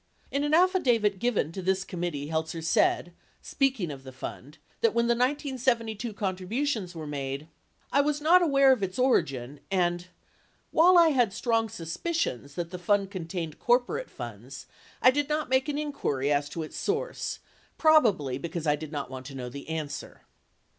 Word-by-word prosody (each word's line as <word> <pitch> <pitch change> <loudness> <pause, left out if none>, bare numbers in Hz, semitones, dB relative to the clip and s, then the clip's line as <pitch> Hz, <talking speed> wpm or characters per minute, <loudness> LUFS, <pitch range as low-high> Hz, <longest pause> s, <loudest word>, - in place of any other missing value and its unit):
In 280 +1 0
an 295 +1 +3
affidavit 245 - +3
given 225 -10 0
to 190 - -6
this 190 +1 +1
committee, 175 -6 -4
Heltzer 160 +1 -2
said, 170 +1 +2 0.3
speaking 260 - 0
of 135 -2 -9
the 130 - -9
fund, 130 +3 -8 0.2
that 230 -1 +2
when 235 0 +3
the 235 - +3
1972 245 -4 0
contributions 200 +1 -2
were 160 -1 -6
made, 140 0 -4 0.4
"I 280 - +4
was 295 0 0
not 335 +5 +5
aware 275 -5 +5
of 255 -5 +2
its 190 -1 -3
origin" 140 - +1
and 175 -2 0 0.6
"while 355 +3 +6
I 335 -1 +7
had 245 -9 +2
strong 225 -1 0
suspicions 165 - -3
that 170 0 -4
the 180 - -6
fund 200 +2 +1
contained 165 -4 -5
corporate 250 - +1
funds, 120 +2 -9 0.4
I 255 - +8
did 290 +2 -1
not 300 -2 -1
make 260 +3 +2
an 290 - -1
inquiry 150 - -1
as 145 0 0
to 165 - -4
its 155 - -9
source, 460 +5 -2 0.4
probably 210 - +4
because 170 +2 -4
I 150 -1 +3
did 150 0 -8
not 140 -4 -4
want 130 0 -7
to 140 - -9
know 125 -2 -5
the 140 +5 -9
answer." 155 -3 -5
195 Hz, 170 wpm, -28 LUFS, -, 0.6 s, I